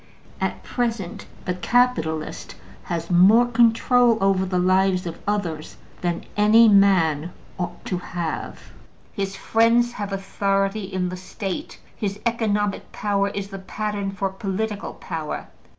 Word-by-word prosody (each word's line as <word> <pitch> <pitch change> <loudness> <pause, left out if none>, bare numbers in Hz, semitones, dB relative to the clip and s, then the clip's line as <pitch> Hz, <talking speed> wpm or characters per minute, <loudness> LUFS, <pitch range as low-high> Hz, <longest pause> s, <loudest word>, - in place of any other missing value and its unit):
At - - -2
present, 230 -7 -3 0.2
the 180 - 0
capitalist 180 -6 0 0.3
has 170 0 -3
more 200 +7 +6
control 240 0 +4
over 195 -1 +2
the 180 0 -1
lives 185 0 +2
of 170 - -6
others 175 -7 -2 0.2
than 175 -1 -2
any 215 +2 +6
man 180 -6 +4 0.3
ought 175 -1 -5
to 180 - -2
have; 170 -2 -5 0.4
his 195 -1 -3
friends 230 +3 +3
have 205 -4 -5
authority 195 +1 -1
in 185 -1 -1
the 185 - -6
State; 190 +1 -5 0.2
his 200 -1 -3
economic 210 -3 0
power 200 -1 0
is 200 0 -5
the 195 -1 -7
pattern 205 +1 -3
for 195 0 -2
political 200 +1 -3
power. 160 -3 -5
195 Hz, 130 wpm, -23 LUFS, 180-215 Hz, 0.4 s, more